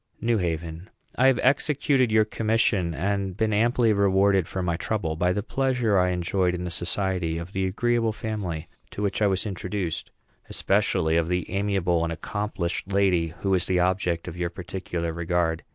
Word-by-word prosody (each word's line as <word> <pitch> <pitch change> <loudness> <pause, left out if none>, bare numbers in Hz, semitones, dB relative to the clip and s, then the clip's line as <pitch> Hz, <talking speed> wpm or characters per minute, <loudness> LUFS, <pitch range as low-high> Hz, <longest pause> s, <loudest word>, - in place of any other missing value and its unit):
NEW 115 -1 +1
HAVEN. 85 +1 -3 0.3
I 130 - +4
have 135 -2 +4
executed 135 -2 +2
your 110 0 +4
commission, 105 -6 +1
and 100 +1 -1
been 110 -1 +1
amply 115 +1 +3
rewarded 100 -2 +3
for 95 - -3
my 85 -2 0
trouble 85 -4 -2
by 90 +3 +1
the 100 +2 -1
pleasures 125 -4 +1
I 90 -1 +3
enjoyed 90 0 0
in 90 - -4
the 90 - -4
society 90 -1 -1
of 85 +3 -7
the 95 0 0
agreeable 115 +3 +1
family 100 -8 -4 0.2
to 105 - -5
which 100 +1 -1
I 105 - +5
was 95 +1 0
introduced; 95 -3 -3 0.4
especially 80 +1 +1
of 85 -1 +1
the 90 +1 -1
amiable 95 -4 +1
and 85 - -1
accomplished 95 0 -3
lady 95 -4 +3
who 95 -1 +1
is 90 - +1
the 90 -1 +2
object 90 -2 0
of 90 - -6
your 90 -1 -1
particular 85 -1 -4
regard. 85 -1 0
95 Hz, 175 wpm, -25 LUFS, 85-105 Hz, 0.4 s, I